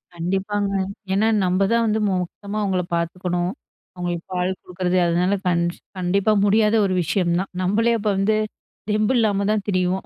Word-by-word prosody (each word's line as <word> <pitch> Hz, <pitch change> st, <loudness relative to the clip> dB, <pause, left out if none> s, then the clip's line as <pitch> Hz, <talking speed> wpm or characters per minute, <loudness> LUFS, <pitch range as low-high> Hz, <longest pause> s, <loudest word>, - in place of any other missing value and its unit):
கண்டிப்பாங்க. 195 Hz, +4 st, -1 dB, 0.4 s
ஏன்னா, 215 Hz, +3 st, +3 dB, 0.2 s
நம்ப 185 Hz, +2 st, +1 dB
தான் 230 Hz, 0 st, +3 dB
வந்து 215 Hz, +1 st, +1 dB
மொத்தமா 195 Hz, +3 st, -4 dB
அவுங்கள 190 Hz, -3 st, 0 dB
பாத்துக்கணும், 175 Hz, +1 st, -1 dB, 0.4 s
அவுங்களுக்கு 175 Hz, -1 st, -3 dB
பால் 180 Hz, +1 st, 0 dB
குடுக்குறது 180 Hz, 0 st, -2 dB
அதனால 180 Hz, +4 st, +1 dB
கண் 170 Hz, -1 st, +2 dB, 0.4 s
கண்டிப்பா 195 Hz, +4 st, +2 dB
முடியாத 215 Hz, +2 st, +3 dB
ஒரு 185 Hz, -, 0 dB
விஷயம் 170 Hz, +1 st, 0 dB
தான். 190 Hz, -, -4 dB
நம்பளே 225 Hz, +5 st, +2 dB
அப்போ 210 Hz, 0 st, 0 dB
வந்து, 215 Hz, +2 st, +2 dB, 0.5 s
தெம்பு 215 Hz, +4 st, +2 dB
இல்லாமதான் 205 Hz, -1 st, +1 dB
திரிவோம். 185 Hz, 0 st, 0 dB
190 Hz, 145 wpm, -22 LUFS, 180-210 Hz, 0.5 s, ஏன்னா